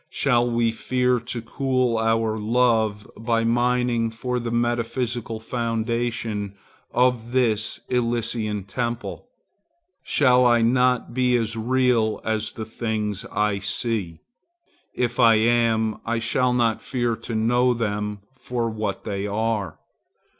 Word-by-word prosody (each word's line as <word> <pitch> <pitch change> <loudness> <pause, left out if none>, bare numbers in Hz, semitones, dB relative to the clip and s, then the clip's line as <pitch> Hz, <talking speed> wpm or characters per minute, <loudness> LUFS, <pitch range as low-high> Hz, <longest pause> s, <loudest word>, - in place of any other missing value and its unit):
Shall 120 -3 +2
we 115 -1 +1
fear 125 +2 0
to 115 0 -5
cool 130 -1 0
our 115 0 +1
love 110 -2 +1
by 115 0 0
mining 120 0 +1
for 125 +2 -3
the 120 -1 -4
metaphysical 120 0 -1
foundation 115 -2 -2 0.4
of 125 -1 +1
this 115 -4 +1
Elysian 115 -4 -1
temple? 120 - -4 0.7
Shall 125 -3 +4
I 120 -2 +4
not 125 0 +2
be 125 0 +2
as 115 -1 -2
real 120 -1 +1
as 110 0 -2
the 110 - -6
things 110 -3 -3
I 105 -1 0
see? 100 -3 -2 0.7
If 120 0 -1
I 115 -2 +7
am, 110 -1 +2
I 115 +1 -1
shall 120 +2 +1
not 115 -2 +1
fear 120 -3 -1
to 115 - -6
know 120 +3 +2
them 105 -2 -3
for 120 -3 -3
what 105 -2 -3
they 100 -1 -3
are. 105 -4 -2
115 Hz, 125 wpm, -23 LUFS, 110-125 Hz, 0.7 s, I